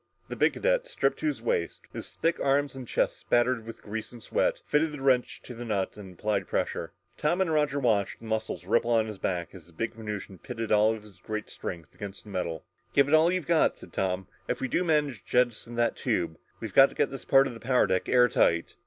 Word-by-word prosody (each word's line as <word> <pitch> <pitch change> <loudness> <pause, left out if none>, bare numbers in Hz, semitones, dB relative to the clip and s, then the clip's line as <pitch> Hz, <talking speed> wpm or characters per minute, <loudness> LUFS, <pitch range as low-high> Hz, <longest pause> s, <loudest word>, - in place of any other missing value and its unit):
The - - -4
big - - +3
cadet, - - +1
stripped - - 0
to 310 -1 +1
the - - -10
waist, 475 -2 -1
his - - -7
thick 165 +1 0
arms 140 0 +1
and 130 -2 -7
chest - - 0
splattered 120 -1 +1
with 115 - -9
grease 110 +1 -5
and 120 -2 -12
sweat, - - +1
fitted 150 +1 +1
the 145 - -7
wrench 130 -2 +2
to 125 - -8
the 120 0 -7
nut 100 -5 -1
and 95 -4 -11
applied 100 -2 -1
pressure. - - -2 0.3
Tom 170 +5 +1
and 180 -4 +1
Roger 150 -2 +2
watched 110 -7 +1
the - - -13
muscles 110 -5 -3
ripple 115 +4 +2
along 110 -1 +3
his 105 -3 -7
back, 85 -3 -2
as 90 -4 -12
the 85 - -18
big 115 +7 -3
Venusian 105 -4 -6
pitted 115 -3 -5
all 105 +1 +5
of 110 - -11
his 100 -4 -16
great 110 +3 -5
strength 85 -4 -7
against 100 -1 -8
the 105 - -12
metal. 85 -4 -3 0.3
"Give 140 0 +5
it 145 - 0
all 160 +2 +6
you've 185 -4 -1
got," 165 0 +3
said - - -13
Tom. 95 0 -1 0.2
"If - - -1
we 130 - -1
do 175 - +1
manage 150 - +1
to - - -33
jettison 120 -1 +1
that 120 0 +1
tube, 80 -1 -1 0.2
we've 110 -4 -6
got 135 0 +8
to - - -14
keep - - +1
this 135 - -7
part 135 0 +5
of 130 - -4
the 115 - -10
power 125 +2 +3
deck 95 - 0
airtight!" 125 -9 +3
115 Hz, 240 wpm, -28 LUFS, 100-140 Hz, 0.3 s, got